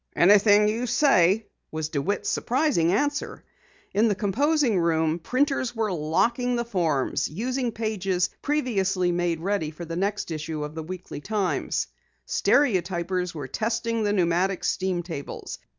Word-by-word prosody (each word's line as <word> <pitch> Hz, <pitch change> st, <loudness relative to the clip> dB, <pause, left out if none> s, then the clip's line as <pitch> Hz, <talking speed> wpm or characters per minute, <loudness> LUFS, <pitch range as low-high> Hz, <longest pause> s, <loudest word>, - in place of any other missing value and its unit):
"Anything 205 Hz, +3 st, +6 dB
you 230 Hz, +4 st, -1 dB
say," 220 Hz, -, +3 dB, 0.3 s
was 155 Hz, -1 st, -3 dB
DeWitt's 155 Hz, +7 st, -2 dB
surprising 250 Hz, -, +1 dB
answer. 290 Hz, +9 st, -1 dB, 0.5 s
In 210 Hz, +4 st, +3 dB
the 205 Hz, -, +1 dB
composing 250 Hz, -, +1 dB
room, 160 Hz, -1 st, +1 dB
printers 255 Hz, -, 0 dB
were 220 Hz, -3 st, 0 dB
locking 230 Hz, -, +1 dB
the 235 Hz, 0 st, -1 dB
forms, 165 Hz, -, 0 dB
using 245 Hz, -, -2 dB
pages 195 Hz, -5 st, -1 dB
previously 195 Hz, -11 st, 0 dB
made 175 Hz, -2 st, -1 dB
ready 195 Hz, -4 st, -1 dB
for 160 Hz, +3 st, -8 dB
the 165 Hz, 0 st, -5 dB
next 200 Hz, 0 st, -2 dB
issue 155 Hz, -1 st, -4 dB
of 150 Hz, 0 st, -6 dB
the 160 Hz, -, -5 dB
Weekly 180 Hz, -2 st, -7 dB
Times. 205 Hz, +1 st, -1 dB, 0.4 s
Stereotypers 180 Hz, -, +1 dB
were 145 Hz, -4 st, -5 dB
testing 230 Hz, -, -1 dB
the 205 Hz, -1 st, +1 dB
pneumatic 185 Hz, 0 st, +1 dB
steam 185 Hz, -2 st, -1 dB
tables. 160 Hz, -5 st, -7 dB
195 Hz, 135 wpm, -25 LUFS, 170-230 Hz, 0.5 s, Anything